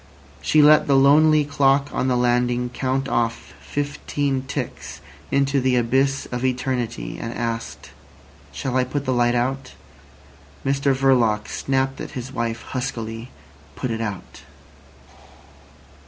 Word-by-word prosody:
She 155 -1 +4
let 150 0 +6
the 140 - +4
lonely 150 +2 +5
clock 140 0 +2
on 130 - 0
the 125 -1 +2
landing 125 0 +1
count 135 +1 -1
off 115 -2 -2
fifteen 145 -1 -2
ticks - - -5 0.3
into 140 0 +2
the 130 0 +2
abyss 130 +3 +1
of 125 0 -3
eternity, 125 -2 -2
and 115 - -4
asked: 115 -1 -4 0.6
"Shall 125 - -2
I 130 - +3
put 140 +3 -3
the 130 - +1
light 120 0 +2
out?" 130 +2 -2 0.9
Mr 135 0 +2
Verloc 120 -6 +2
snapped 135 0 -1
at - - -7
his 125 +1 -6
wife 115 -2 -3
huskily. 115 -2 -5 0.5
"Put 130 - -3
it 115 0 -3
out." 105 -4 -6
130 Hz, 130 wpm, -22 LUFS, 120-135 Hz, 0.9 s, let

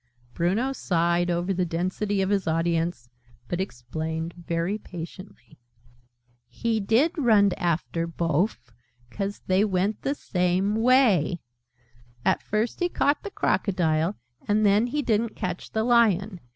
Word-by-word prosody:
Bruno 205 - 0
sighed 175 -5 +1
over 175 +2 0
the 185 0 0
density 185 +4 -1
of 190 - -1
his 195 -3 0
audience, 165 -4 0 0.4
but 175 +6 -2
explained 160 +2 -4
very 170 +4 -2
patiently. 175 - -10 0.9
"He 230 -1 -1
did 225 +10 +3
runned 210 -7 +4
after 170 -1 -1
bofe: 165 - -1 0.4
'cause 200 0 -4
they 185 +2 +3
went 200 +1 0
the 280 - -1
same 185 -1 0
way! 225 - +3 0.9
And - - +2
first 215 +2 -2
he 355 -1 +1
caught 285 -3 +1
the 410 - -6
Crocodile, 175 - 0 0.3
and 210 +1 +2
then 205 +4 +4
he 290 +4 -2
didn't 225 -1 0
catch 180 -1 -4
the 220 - -1
Lion. 215 -5 +3
190 Hz, 130 wpm, -25 LUFS, 170-215 Hz, 0.9 s, runned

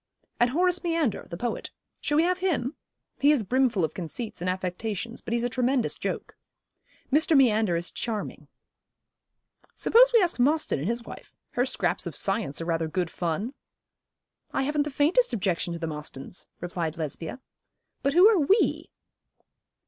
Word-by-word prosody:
'And 240 - +4
Horace 360 +6 +1
Meander, 330 - 0
the 170 - -6
poet. 235 +3 -3 0.3
Shall 295 - 0
we 320 - +5
have 365 +1 +1
him? 315 -8 0 0.5
He 285 - +5
is 280 -7 +2
brimful 240 -5 +2
of 155 - -6
conceits 210 +5 -6
and 180 - 0
affectations, 190 +5 -3
but - - -7
he's 235 0 +1
a - - +2
tremendous 250 0 +1
joke.' - - -4 0.8
'Mr. 310 0 +4
Meander 220 -8 +4
is 170 +1 -3
charming.' 220 -3 -5 1.3
'Suppose - - +5
we 470 - +6
ask 345 -7 0
Mostyn 295 - +2
and 150 - -3
his 235 +1 -1
wife? - - -11 0.2
Her 245 +2 +1
scraps - - -1
of - - -6
science 150 -11 0
are 165 - -4
rather 165 -1 0
good 170 +1 -2
fun.' 180 - -2 1.0
'I 270 - +1
haven't 295 +1 +1
the - - -3
faintest 295 - +2
objection 185 -5 -1
to - - -4
the 165 - -3
Mostyns,' 150 0 -6
replied 170 -2 -3
Lesbia. 160 - -5 0.6
'But 275 +1 +1
who 360 +5 +8
are 435 -4 +5
"we"?' 380 +9 +2
235 Hz, 165 wpm, -27 LUFS, 180-295 Hz, 1.3 s, who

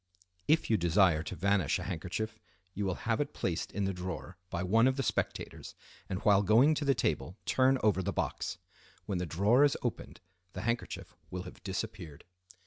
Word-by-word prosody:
If 160 +1 +3
you 110 - +5
desire 85 -2 +4
to 80 - -6
vanish 100 -2 +2
a - - -5
handkerchief 100 +6 -4 0.3
you 100 +1 -2
will 95 - 0
have - - +1
it - - -4
placed - - -2
in 100 0 -1
the 95 - -1
drawer 90 -2 -6
by 85 0 -2
one 115 +7 +4
of 130 - +2
the 135 - 0
spectators, - - -3 0.3
and 95 - -1
while 100 -1 +5
going 115 +9 +5
to 150 -1 -2
the 135 -1 +3
table 90 - -1
turn 130 +1 +3
over 105 -3 +3
the - - -1
box. - - -2 0.5
When 95 -3 -2
the 90 - -2
drawer 105 - +4
is 145 - +3
opened - - -4 0.3
the - - -5
handkerchief 115 +1 -3 0.2
will 90 0 -5
have 90 - -11
disappeared. 95 -6 -5
100 Hz, 190 wpm, -31 LUFS, 90-115 Hz, 0.5 s, you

